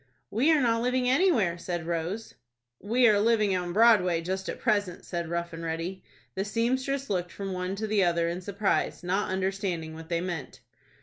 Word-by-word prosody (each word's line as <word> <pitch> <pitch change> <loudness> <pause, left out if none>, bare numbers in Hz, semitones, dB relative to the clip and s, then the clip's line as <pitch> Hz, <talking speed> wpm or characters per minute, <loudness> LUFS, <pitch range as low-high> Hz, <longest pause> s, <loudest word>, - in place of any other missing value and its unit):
"We 260 +10 +3
are 310 -2 +4
not 230 -2 +2
living 250 +1 +1
anywhere," 250 - +3
said 175 -2 -4
Rose. 170 +6 -3 0.5
"We 240 +4 +3
are 210 -2 +5
living 215 -3 +3
on 180 -1 -2
Broadway 200 -5 +5
just 190 +2 -3
at - - -5
present," 205 -6 0
said 170 -2 -4
Rough 170 0 -3
and 165 0 -7
Ready. 165 +3 -4 0.3
The 190 - -2
seamstress 260 +6 -1
looked 180 -3 -2
from 195 -1 -5
one 180 +1 -3
to 215 +2 -3
the 210 -2 +2
other 170 -1 +2
in 175 +2 -3
surprise, 200 -1 -1
not 190 +3 0
understanding 190 -4 -2
what 160 0 -10
they 170 -1 0
meant. 170 -6 -5
190 Hz, 185 wpm, -28 LUFS, 175-225 Hz, 0.5 s, are